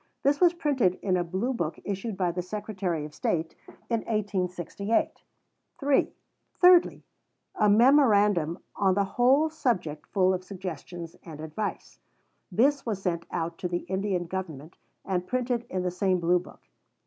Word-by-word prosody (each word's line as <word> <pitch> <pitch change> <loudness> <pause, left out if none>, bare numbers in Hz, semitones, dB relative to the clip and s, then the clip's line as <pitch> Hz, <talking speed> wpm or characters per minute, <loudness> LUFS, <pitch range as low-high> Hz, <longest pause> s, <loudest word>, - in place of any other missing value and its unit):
This 285 +3 +2
was 350 -1 +5
printed 265 - +1
in 190 -2 +2
a 180 - +1
Blue 190 +9 -2
book 170 -8 -3
issued 200 +1 -4
by 180 -2 +1
the 180 +1 -3
Secretary 185 -4 -3
of 150 - -10
State 160 +1 -1 0.3
in 230 -1 0
1868. 200 -1 -1 0.6
(3) 280 -2 +2 0.4
Thirdly, 360 -1 +5 0.5
a 210 - +3
memorandum 205 - +4 0.2
on 190 -2 +2
the 200 - +3
whole 255 +9 +3
subject 185 - -2
full 190 -1 +2
of 185 0 -3
suggestions 175 -3 -7
and 160 -3 -10
advice. 160 +7 -5 0.5
This 270 +8 +3
was 215 -5 -3
sent 170 -3 -2
out 165 0 -3
to 180 - -2
the 175 0 -2
Indian 190 -2 -1
Government, 165 -4 -6 0.3
and 180 -2 -2
printed 245 -1 -1
in 185 -1 -2
the 180 - -1
same 185 0 +1
Blue 175 +1 +3
book. 175 - -14
190 Hz, 150 wpm, -27 LUFS, 175-230 Hz, 0.6 s, was